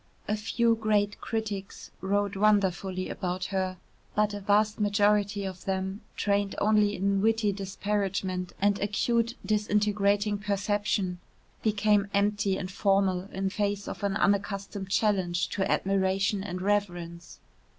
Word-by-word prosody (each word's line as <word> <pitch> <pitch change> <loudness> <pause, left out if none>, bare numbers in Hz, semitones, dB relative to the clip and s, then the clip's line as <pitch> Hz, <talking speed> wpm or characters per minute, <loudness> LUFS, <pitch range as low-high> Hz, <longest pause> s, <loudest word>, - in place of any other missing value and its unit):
A 210 - +1
few 230 +2 +1
great 210 -2 0
critics 210 -3 -4
wrote 200 +1 0
wonderfully 195 -2 +1
about 180 0 -3
her, 185 -1 -1 0.4
but 210 0 +2
a 205 - -4
vast 205 +2 +2
majority 205 -1 +2
of 185 -2 -7
them, 190 +1 -2 0.2
trained 200 -1 0
only 210 -1 +3
in 195 +1 +1
witty 220 -1 +2
disparagement 195 -2 -2
and 200 0 +2
acute 230 +3 0
disintegrating 205 -1 +1
perception, 200 -2 -1 0.4
became 210 -1 +2
empty 200 -1 +1
and 185 -1 -5
formal 195 -1 +1
in 190 0 -2
face 205 0 -1
of - - -6
an 200 -1 0
unaccustomed 200 0 -1
challenge 190 -4 +1
to 195 - -1
admiration 195 +1 +1
and 185 -2 -5
reverence. 175 -4 -2
200 Hz, 125 wpm, -28 LUFS, 190-210 Hz, 0.4 s, only